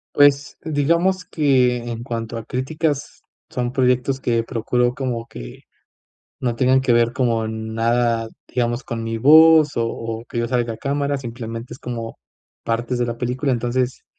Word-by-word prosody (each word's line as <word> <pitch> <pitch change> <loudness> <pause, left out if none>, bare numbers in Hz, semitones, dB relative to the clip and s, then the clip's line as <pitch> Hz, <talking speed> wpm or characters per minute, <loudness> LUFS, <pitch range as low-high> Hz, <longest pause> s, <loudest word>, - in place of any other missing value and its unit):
Pues, 145 -1 +4
digamos 170 +5 +1
que 130 -7 +2
en 120 -1 -5
cuanto 115 -2 -4
a 115 - -6
críticas 145 +4 -3 0.3
son 125 -1 -2
proyectos 125 +1 +1
que 115 -3 0
procuro 120 +1 0
como 120 -4 -3
que - - -10 0.8
no 120 -2 -1
tengan 130 +2 +3
que 130 -2 +2
ver 120 0 +3
como 115 -3 0
nada, 115 +1 0 0.2
digamos 120 0 -1
con 115 -1 -4
mi 115 0 -3
voz 155 +3 +7
o 115 - +1
o 115 0 -5
que 120 - -5
yo 115 - 0
salga 120 -2 -1
a - - -10
cámara 140 +3 -1
simplemente 115 -1 -7
es - - -14
como 115 -2 -6 0.4
partes 120 +2 -1
de 120 - +1
la 115 0 -4
película, 125 +3 -1
entonces 125 +1 -1
120 Hz, 160 wpm, -21 LUFS, 115-135 Hz, 0.8 s, voz